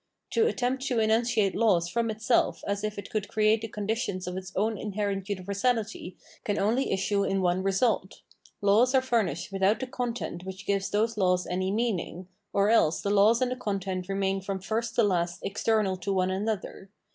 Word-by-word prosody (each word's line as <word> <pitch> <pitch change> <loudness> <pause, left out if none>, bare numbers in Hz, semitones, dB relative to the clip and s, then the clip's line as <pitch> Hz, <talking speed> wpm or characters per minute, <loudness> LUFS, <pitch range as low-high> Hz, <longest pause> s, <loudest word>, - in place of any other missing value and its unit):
To 455 0 +3
attempt 255 - -1
to 245 - 0
enunciate 220 -2 +2
laws 195 -7 +2
from 230 +5 -1
itself 220 +2 +1
as 200 0 -2
if 215 -1 -3
it 200 - -7
could 210 -2 -2
create 215 +1 +2
the 225 - -4
conditions 210 -2 -3
of 180 0 -4
its 185 0 -6
own 215 +3 +1
inherent 200 -1 -3
universality 200 0 -2 0.3
can 205 -1 -1
only 225 +7 +1
issue 200 +1 +1
in 195 0 0
one 180 +1 +2
result: 195 0 0 0.4
laws 220 +6 +4
are 260 - +5
furnished 200 - 0
without 195 +2 +2
the 260 - -2
content 245 -8 -4
which 190 +1 -8
gives 200 -1 0
those 220 +2 0
laws 180 -2 +2
any 185 +1 -1
meaning, 195 -5 -2 0.2
or 200 +1 +3
else 170 -8 +3
the 200 - -1
laws 215 +5 +5
and 250 - -1
the - - -1
content 195 -5 -3
remain 195 0 0
from 195 0 -3
first 225 +4 -2
to 235 - +4
last 180 -2 0
external 205 -1 +1
to 185 +2 -3
one 185 -1 +1
another. 195 -1 -3
200 Hz, 185 wpm, -28 LUFS, 190-225 Hz, 0.4 s, are